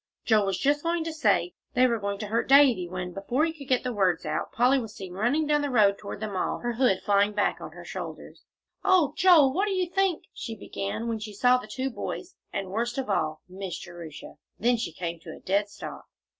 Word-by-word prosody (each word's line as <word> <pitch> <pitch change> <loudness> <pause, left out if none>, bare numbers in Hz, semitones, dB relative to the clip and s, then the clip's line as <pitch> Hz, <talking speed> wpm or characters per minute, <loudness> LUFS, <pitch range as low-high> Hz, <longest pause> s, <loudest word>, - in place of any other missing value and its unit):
Joel 215 -3 +3
was 195 -2 0
just 290 +6 +2
going 335 0 0
to 325 0 -4
say, 200 - +2 0.2
"They 250 +1 +5
were 235 -2 +1
going 200 0 -2
to - - -3
hurt 225 +4 -1
Davie," 260 -11 +6
when, 180 0 -5
before 240 - 0
he 325 - -2
could 285 -4 -11
get 255 -1 +2
the 250 -1 -2
words 185 -5 +1
out, 155 0 -2
Polly 255 +3 +3
was 225 -3 -7
seen 190 -2 -8
running 245 +11 +1
down 295 0 +2
the 290 - -1
road 205 -5 +4
toward 200 0 -7
them 215 -2 -4
all, 185 - -1
her 240 0 -3
hood 230 -6 +2
flying 205 0 +3
back 205 0 0
on - - -8
her - - -11
shoulders. - - -8 0.4
"Oh, 370 -7 +4
Joel, 315 -8 +6
what 385 +7 +1
do 400 - 0
you 370 -1 0
think 380 -1 +1
" - - -56
she 225 - -6
began, 200 +2 -4
when 225 -1 -2
she 215 0 -7
saw 250 +4 +5
the 215 - -10
two 265 +3 -3
boys, 360 +8 -5 0.2
and, 195 -2 -4
worst 235 +4 -2
of 260 -6 -2
all, 155 -4 -1
Miss 185 -1 -6
Jerusha; 170 -3 -10 0.2
then 240 +3 +3
she 225 -7 -3
came 170 0 -5
to 160 -1 -9
a - - -13
dead 200 +2 0
stop. - - -8
225 Hz, 240 wpm, -27 LUFS, 195-275 Hz, 0.4 s, Davie